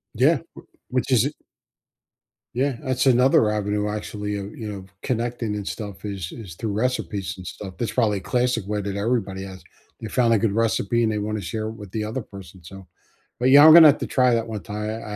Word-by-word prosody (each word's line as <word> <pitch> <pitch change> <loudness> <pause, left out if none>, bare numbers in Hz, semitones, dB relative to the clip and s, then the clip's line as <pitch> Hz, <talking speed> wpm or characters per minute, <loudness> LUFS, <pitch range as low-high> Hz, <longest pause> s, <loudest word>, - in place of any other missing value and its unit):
Yeah. - - +4 0.2
W - - -13 0.2
which - - -1
is - - +4
it - - -3 1.2
Yeah, 135 0 0
that's 130 -3 -1
another 125 -3 +4
avenue 105 0 -1
actually 105 -1 -4
of, 100 +1 -7
you 110 -2 -6
know, 95 -2 -8 0.2
connecting 120 -3 -2
and 100 -1 -6
stuff 100 -4 -6
is 95 -4 -5
is 100 -8 -9
through 110 +3 -4
recipes 105 -3 -2
and 95 - -11
stuff, 95 +1 -8
that's 120 - -2
probably 105 -5 +1
classic 125 -2 0
way 105 +1 -2
that 100 -1 -4
everybody 100 -3 -1
has, 95 -1 -9 0.4
they 110 - -6
found 115 0 +2
a - - +4
good 105 -1 0
recipe 115 +1 +1
and 110 - +1
they 105 - -2
wanna 105 0 -3
share 110 +5 -4
it 110 - -5
with 105 -4 -11
the 110 0 -3
other 110 +5 -4
person, 95 -4 -13
so 95 +2 -12 0.5
But, 125 - +3
yeah, 145 +2 +9
I'm 160 - +10
gonna 165 -1 +10
have 145 - +3
to - - -3
try 125 -2 +3
that 115 0 0
one 110 -5 -6
time, 105 +2 -4
I 110 -1 -6
105 Hz, 220 wpm, -23 LUFS, 100-120 Hz, 1.2 s, I'm